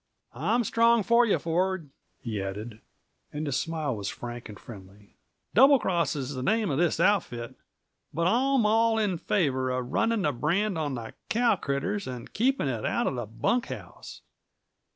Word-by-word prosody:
"I'm 200 Hz, -, +1 dB
strong 230 Hz, +1 st, +3 dB
for 235 Hz, +3 st, +4 dB
you, 205 Hz, -, +3 dB
Ford," 175 Hz, -2 st, -1 dB, 0.3 s
he 110 Hz, -4 st, -3 dB
added, 105 Hz, +3 st, -6 dB, 0.5 s
and 150 Hz, +1 st, -4 dB
his 140 Hz, -3 st, -1 dB
smile 155 Hz, -6 st, -2 dB
was 100 Hz, -1 st, -4 dB
frank 120 Hz, -1 st, -7 dB
and 105 Hz, -, -10 dB
friendly. 100 Hz, -2 st, -13 dB, 0.4 s
"Double 270 Hz, +6 st, +7 dB
Cross 175 Hz, -9 st, 0 dB
is 140 Hz, -1 st, -4 dB
the 130 Hz, -, -4 dB
name 215 Hz, -, +1 dB
of 135 Hz, -, 0 dB
this 175 Hz, -2 st, +1 dB
outfit, 170 Hz, -11 st, +1 dB, 0.6 s
but 165 Hz, +1 st, -1 dB
I'm 255 Hz, +4 st, +3 dB
all 225 Hz, +1 st, +3 dB
in 200 Hz, -6 st, 0 dB
favor 135 Hz, -11 st, 0 dB
of 125 Hz, -1 st, -3 dB
running 225 Hz, -3 st, +1 dB
that 145 Hz, -6 st, -1 dB
brand 190 Hz, +6 st, +1 dB
on 150 Hz, -4 st, -2 dB
the 115 Hz, -2 st, -7 dB, 0.2 s
cow 235 Hz, -1 st, +3 dB
critters 190 Hz, +6 st, -2 dB
and 125 Hz, -2 st, -7 dB
keeping 255 Hz, -, +1 dB
it 120 Hz, -5 st, -2 dB
out -, -, 0 dB
of -, -, 0 dB
the 120 Hz, -4 st, -4 dB
bunk 235 Hz, -, 0 dB
house. -, -, -9 dB
165 Hz, 175 wpm, -27 LUFS, -, 0.6 s, Double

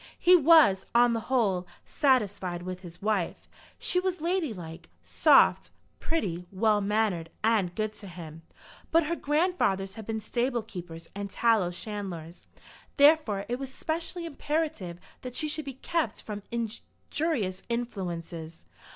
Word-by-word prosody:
He 360 Hz, +1 st, +6 dB
was, 305 Hz, -, +6 dB
on 240 Hz, 0 st, +6 dB
the 230 Hz, -, 0 dB
whole, 200 Hz, -9 st, +1 dB, 0.2 s
satisfied 205 Hz, -, +1 dB
with 185 Hz, 0 st, -5 dB
his 175 Hz, 0 st, -12 dB
wife. 205 Hz, -5 st, -1 dB, 0.3 s
She 360 Hz, -, +1 dB
was 370 Hz, 0 st, -1 dB
ladylike, 215 Hz, -, -3 dB
soft, -, -, +4 dB, 0.3 s
pretty, 180 Hz, -, -2 dB
well 210 Hz, +2 st, +2 dB
mannered, 200 Hz, -5 st, 0 dB
and 210 Hz, -6 st, +2 dB
good 215 Hz, 0 st, -1 dB
to 200 Hz, -, -9 dB
him. 165 Hz, -3 st, -9 dB, 0.5 s
But 330 Hz, 0 st, +4 dB
her 340 Hz, +3 st, -1 dB
grandfathers 295 Hz, -, +1 dB
had 220 Hz, -1 st, -9 dB
been 220 Hz, -1 st, -2 dB
stable 240 Hz, +2 st, -1 dB
keepers 170 Hz, -4 st, -9 dB
and 200 Hz, 0 st, -5 dB
tallow 220 Hz, -3 st, +2 dB
chandlers. 180 Hz, -3 st, -6 dB, 0.5 s
Therefore 285 Hz, -9 st, +5 dB
it 245 Hz, +1 st, -2 dB
was 270 Hz, -1 st, -5 dB
specially 335 Hz, +4 st, -3 dB
imperative 295 Hz, -, -2 dB, 0.2 s
that 250 Hz, -1 st, -7 dB
she 310 Hz, -, 0 dB
should 305 Hz, 0 st, -2 dB
be 275 Hz, -, -5 dB
kept 330 Hz, +4 st, -2 dB
from 210 Hz, -1 st, -6 dB
injurious 235 Hz, -, -3 dB
influences. 175 Hz, -8 st, -4 dB
215 Hz, 135 wpm, -28 LUFS, 185-285 Hz, 0.5 s, He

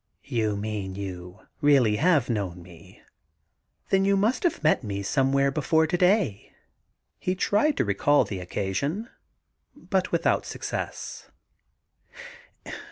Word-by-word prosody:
' -, -, -46 dB, 0.2 s
You 105 Hz, -2 st, 0 dB
mean 100 Hz, -2 st, -4 dB
you 90 Hz, -2 st, -7 dB
have -, -, -27 dB
really 135 Hz, -7 st, +4 dB, 0.3 s
known 95 Hz, -7 st, -3 dB
me. 85 Hz, -2 st, -16 dB, 0.9 s
Then 195 Hz, 0 st, +4 dB
you 200 Hz, 0 st, +3 dB
must 220 Hz, +6 st, +1 dB
have 345 Hz, -, -1 dB
met 155 Hz, -3 st, +3 dB
me 100 Hz, -2 st, -4 dB
somewhere 135 Hz, +4 st, +2 dB
before 160 Hz, +3 st, +2 dB
to 160 Hz, -, -1 dB
day 180 Hz, -, +2 dB
I' -, -, -33 dB, 0.6 s
He 185 Hz, -, -1 dB
tried 210 Hz, +10 st, +1 dB
to -, -, +1 dB
recall 125 Hz, +9 st, +3 dB
the 95 Hz, -, -5 dB
occasion, 120 Hz, -, -3 dB, 0.6 s
but -, -, -2 dB
without -, -, +1 dB
success. -, -, -5 dB
130 Hz, 130 wpm, -26 LUFS, -, 0.9 s, really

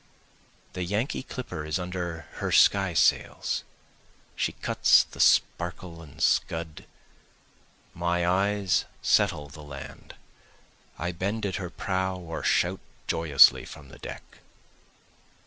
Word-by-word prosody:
The 90 Hz, -, -3 dB
Yankee 105 Hz, -, -2 dB
clipper 130 Hz, -, -6 dB
is 75 Hz, +3 st, -2 dB
under 90 Hz, -2 st, -4 dB, 0.2 s
her -, -, -2 dB
sky 95 Hz, -4 st, +4 dB
sails, -, -, +1 dB, 0.7 s
she -, -, -1 dB
cuts -, -, +4 dB
the -, -, -15 dB
sparkle 85 Hz, -1 st, +1 dB
and 75 Hz, -4 st, -14 dB
scud, 80 Hz, -2 st, 0 dB, 1.1 s
My 85 Hz, 0 st, 0 dB
eyes 100 Hz, +2 st, +1 dB, 0.2 s
settle 75 Hz, -1 st, +2 dB
the 75 Hz, +2 st, -12 dB
land, 70 Hz, -2 st, -10 dB, 0.8 s
I 90 Hz, +2 st, -2 dB
bend 100 Hz, +5 st, -3 dB
at 95 Hz, -, -2 dB
her 90 Hz, -2 st, -5 dB
prow 95 Hz, +1 st, -2 dB
or 85 Hz, -2 st, -6 dB
shout 90 Hz, +2 st, +1 dB, 0.3 s
joyously 80 Hz, -4 st, +5 dB
from 70 Hz, -3 st, -12 dB
the -, -, -14 dB
deck. -, -, -10 dB
90 Hz, 115 wpm, -27 LUFS, 80-95 Hz, 1.1 s, joyously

